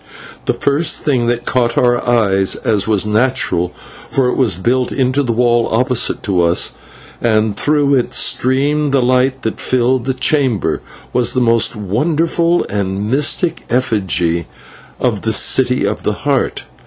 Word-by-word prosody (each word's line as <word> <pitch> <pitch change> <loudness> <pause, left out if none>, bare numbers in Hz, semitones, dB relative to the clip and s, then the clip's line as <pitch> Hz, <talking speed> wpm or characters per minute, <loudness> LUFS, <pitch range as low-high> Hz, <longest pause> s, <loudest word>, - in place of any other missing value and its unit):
The - - +1
first 145 +4 0
thing 130 -6 0
that 120 0 -1
caught 120 -2 0
our 120 -1 +2
eyes, 100 -6 +1
as 105 -2 0
was 105 -2 +2
natural, 105 -6 0 0.4
for 130 -2 +1
it - - -1
was 120 -9 +2
built 120 +7 0
into 130 +1 0
the 125 -4 -1
wall 120 0 +1
opposite 125 +1 +1
to 95 -4 0
us, 85 0 +2 0.5
and 110 -2 +1
through 145 +3 +1
it 125 -3 0
streamed 140 +3 +1
the 135 - +3
light 130 +1 +1
that 110 - -3
filled 125 0 0
the 130 -1 -1
chamber, 130 -5 0 0.3
was 120 0 +1
the 130 - 0
most 115 -1 +2
wonderful 165 - 0
and 100 +1 -3
mystic 150 +5 +1
effigy 95 -9 0 0.5
in - - +1
the - - -1
City - - +2
of - - -2
the - - -1
Heart. - - 0
120 Hz, 155 wpm, -15 LUFS, 110-130 Hz, 0.5 s, the